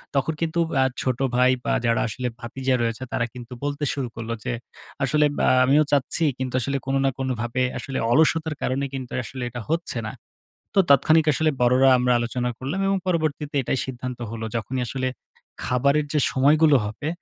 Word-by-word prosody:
তখন 140 +4 +1
কিন্তু 165 0 0 0.2
অ্যা 135 - +4 0.2
ছোট 130 -2 -1 0.2
ভাই, 125 +1 +5
বা - - +1
যারা 115 -1 +2
আসলে 125 +3 -3
ভাতিজা 130 +2 -1
রয়েছে, 115 +2 -2
তারা 120 - +1
কিন্তু 125 0 -9
বলতে 145 +1 -2
শুরু 135 -3 -3
করল 115 0 -6
যে, - - -2 0.5
"আসলে 150 +2 +3
ব্যা - - +3 0.2
আমিও 145 +4 +5
চাচ্ছি 145 +3 +1 0.2
কিন্তু 130 -1 -3
আসলে 140 +4 -1
কোনো 135 0 +1
না - - +4
কোনো 130 -1 -1
ভাবে 120 +2 -1 0.2
আসলে 135 -1 -5
অলস্যতার 160 +3 +3
কারণে 135 +2 -1
কিন্তু 130 -2 -6
আসলে 130 +1 -6
এটা 120 0 -6
হচ্ছে 165 -5 -1
না।" - - -4 0.6
তো - - +2
তাৎক্ষণিক 155 +3 +5
আসলে 155 +2 +2
বড়রা 125 +2 +5
আমরা 125 0 +2
আলোচনা 120 +1 -2
করলাম, 140 +9 -3
এবং 195 - +2
পরবর্তীতে 155 -4 -1
এটাই 130 - -1
সিদ্ধান্ত 125 -1 -6
হলো। 115 0 -5
যখনই 125 +4 -2
আসলে, 130 0 -2 0.6
খাবারের 140 +4 +2
যে, 155 - +2
সময়গুলো 145 +2 +5
হবে 115 +8 -5
130 Hz, 180 wpm, -24 LUFS, 125-150 Hz, 0.6 s, ভাই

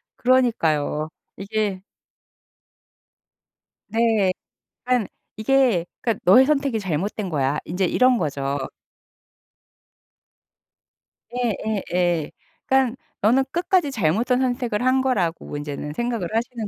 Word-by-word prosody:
그러니까요. 165 - +1 0.3
이게 200 -1 -2 2.0
네. 220 -3 +2 0.5
그러니까 250 -5 +1 0.3
이게 230 -5 +2 0.2
"그러니까 230 -4 -1
너의 250 +9 +7
선택이 275 -6 +1
잘못된 190 +2 -2
거야." 140 -2 0
인제 180 +3 -1
이런 250 +6 +3
거죠. 140 -4 -2 2.7
예예예. 190 -8 -1 0.3
그러니까 265 -2 +2 0.3
너는 250 +6 +3
끝까지 345 -3 +1
잘못된 225 +5 +1
선택을 245 -3 -1
한 260 +1 +3
거라고 185 - -1
인제는 145 0 -5
생각을 230 -2 -2
하시는 230 -1 -2
220 Hz, 235 characters per minute, -23 LUFS, 175-250 Hz, 2.7 s, 너의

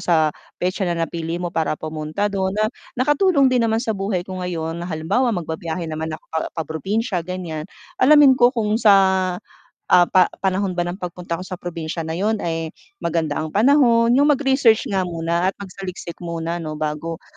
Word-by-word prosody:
sa 160 -3 +2 0.2
petsa 185 +1 -1
na 170 - -1
napili 165 0 -3
mo 175 0 -4
para 160 -2 0
pumunta 155 +4 -4
do'n. 190 0 -1
Na, 215 - +2 0.3
nakatulong 280 0 +3
din 250 - +3
naman 225 +2 +1
sa 220 - 0
buhay 195 -3 -2
ko 185 -1 -6
ngayon 165 -2 -3
na, 175 - -5
halimbawa, 180 +11 0
magbibiyahe 165 0 -4
naman 160 0 -4
ako 155 0 -7
pa 160 - 0 0.2
pa-probinsya, 180 - -2
ganiyan, 170 -2 -5 0.3
alamin 290 0 +7
ko 245 +1 +5
kung 215 -1 0
sa, 210 -4 +7 0.9
ah, 180 -1 +6
pa 185 -1 +5 0.2
panahon 190 -1 0
ba 175 - 0
ng 175 +2 -4
pagpunta 175 -1 -5
ko 185 - -7
sa 185 - -5
probinsya 165 -2 -5
na 160 +2 -4
'yon 215 +2 0
ay 165 -1 -3 0.2
maganda 160 -3 -1
ang 155 +2 -4
panahon, 235 -1 +4
'yung 280 +3 +4
mag-research 265 -4 +2
nga 190 -2 0
muna, 170 +1 -1
at - - -2
magsaliksik 185 -2 -7
muna, 170 0 -4
'no, 155 -2 -5
bago, 155 +2 -4
180 Hz, 180 wpm, -21 LUFS, 165-210 Hz, 0.9 s, alamin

